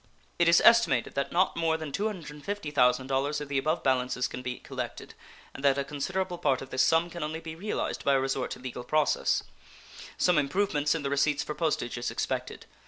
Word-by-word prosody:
It 170 -1 +5
is 170 - +6
estimated 230 - +5
that 140 - -2
not 180 +2 +2
more 165 -1 +1
than 155 -2 -6
$250,000 145 - 0
of 150 - -6
the 140 - 0
above 155 +5 -1
balances 125 -1 +1
can 125 - -7
be 125 -1 -4
collected, - - -7 0.4
and 135 - -9
that 140 -1 +4
a 140 - 0
considerable 175 +6 -3
part 135 0 +1
of 135 - -12
this 130 - +1
sum 165 +5 +3
can 170 - -7
only 155 +2 -3
be 165 -1 -7
realized 195 +6 -3
by 140 - +3
a - - +3
resort 135 -1 -1
to - - -6
legal 125 -1 -6
process. 150 +3 +1 0.7
Some 180 -3 +3
improvements 150 -1 +1
in 160 - -3
the 140 - -2
receipts 140 +1 +2
for 150 - -4
postage 150 -7 -1
is 120 - -2
expected. - - -3
150 Hz, 195 wpm, -28 LUFS, 135-165 Hz, 0.7 s, is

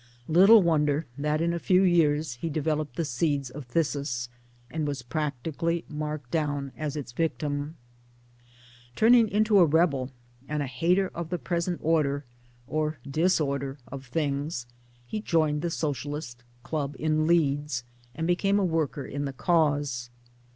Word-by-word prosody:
Little 195 +6 +7
wonder 150 -2 +2
that 150 +2 0
in 170 +1 +1
a 170 - -2
few 185 +2 +3
years 155 -5 +3
he 120 +7 -4
developed 155 0 -1
the 165 - -1
seeds 140 0 -1
of 135 -1 -9
phthisis, 140 -4 -1 0.4
and 155 -2 -2
was 140 -3 -3
practically 155 +5 -2
marked 150 -4 -5
down 145 -4 -1
as 150 -1 -4
its 145 -5 -5
victim. 150 +1 -2 1.2
Turning 230 - +5
into 210 0 +4
a 175 - +7
rebel 145 -5 +2 0.4
and 150 -1 -1
a - - -2
hater 175 +9 +1
of 170 -1 -6
the 180 - -1
present 170 +5 -2
order 145 -3 +1 0.4
(or 155 +2 -1
disorder) 140 -3 0
of 135 -1 -8
things, 140 0 -2 0.4
he 215 - -4
joined 155 -6 +1
the 170 - -1
Socialist 145 -5 -4 0.2
club 145 0 -3
in 155 0 +1
Leeds 145 -5 +1 0.3
and 160 - -2
became 195 +3 +2
a 200 - +2
worker 160 -5 -1
in 145 +1 -4
the 140 - -4
cause. 145 -6 +1
150 Hz, 145 wpm, -27 LUFS, 140-165 Hz, 1.2 s, Little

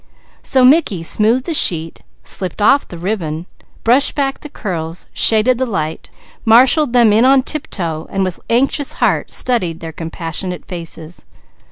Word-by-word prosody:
So 260 -1 +3
Mickey 255 - +3
smoothed 225 +9 +1
the 335 - -2
sheet, 165 - +2 0.2
slipped 185 0 -5
off 275 +7 +3
the 175 - -10
ribbon, 170 -3 -4 0.4
brushed 250 +5 +3
back 275 -2 -1
the 300 - -10
curls, 170 - -5
shaded 230 +3 +3
the 260 - +1
light, 160 -7 -4 0.3
marshalled 250 +4 +4
them 235 -4 +4
in 220 +3 +4
on 265 0 +4
tiptoe, 170 - -4
and 195 0 -1
with 185 -2 -4
anxious 270 +4 0
heart - - 0
studied 180 -10 -1
their 165 -1 -7
compassionate 165 +2 -5
faces. 165 -1 -9
210 Hz, 150 wpm, -16 LUFS, 165-255 Hz, 0.4 s, marshalled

